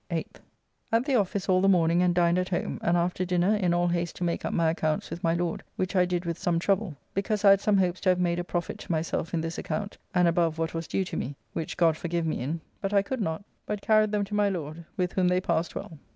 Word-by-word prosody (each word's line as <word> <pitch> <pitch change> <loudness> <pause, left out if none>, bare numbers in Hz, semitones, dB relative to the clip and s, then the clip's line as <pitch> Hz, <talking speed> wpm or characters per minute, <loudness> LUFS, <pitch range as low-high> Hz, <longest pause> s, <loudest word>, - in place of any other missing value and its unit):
8th. - - -4 0.5
At 230 +2 +2
the 280 - 0
office 200 -4 +1
all 185 -1 +4
the 195 - +3
morning 170 -2 +4
and 180 -1 +2
dined 175 0 +3
at 185 - -2
home, 175 - -2
and 170 +1 +2
after 175 +1 0
dinner 180 +3 +2
in 185 -4 +1
all 175 0 +2
haste 170 -1 -1
to - - -5
make 170 -1 -1
up - - -2
my 165 -2 +2
accounts 155 -2 -1
with 170 - -6
my 165 0 +2
Lord, 175 -1 -2
which 185 +1 -2
I 180 -1 +5
did 175 0 -2
with 170 0 -3
some 175 -1 +1
trouble, 190 -2 0 0.2
because 205 +1 -1
I 200 - +9
had 195 0 +5
some 210 -1 +3
hopes 185 -1 +1
to 190 - +2
have 180 0 +3
made 175 -1 +1
a - - -1
profit 175 -1 -3
to - - -6
myself 160 0 -1
in 165 - 0
this 165 +1 -4
account 205 -1 -4 0.2
and 180 -1 +5
above 165 -1 +2
what 165 0 -2
was 165 0 -4
due 190 - -1
to - - -6
me 140 +3 -3 0.2
(which 160 - -4
God 165 -3 +4
forgive 170 0 -2
me 160 - -1
in), 155 +6 -3 0.2
but 195 +1 -2
I 200 - +5
could 260 +3 -3
not, 160 0 -2 0.2
but 210 -1 -3
carried 215 -1 +4
them 210 -1 +1
to 200 +1 -7
my 205 -1 +3
Lord, 165 -3 -5
with 180 -1 0
whom 185 -1 +2
they 180 0 +3
passed 170 -2 -1
well. 160 - -7
175 Hz, 270 wpm, -27 LUFS, 170-195 Hz, 0.5 s, I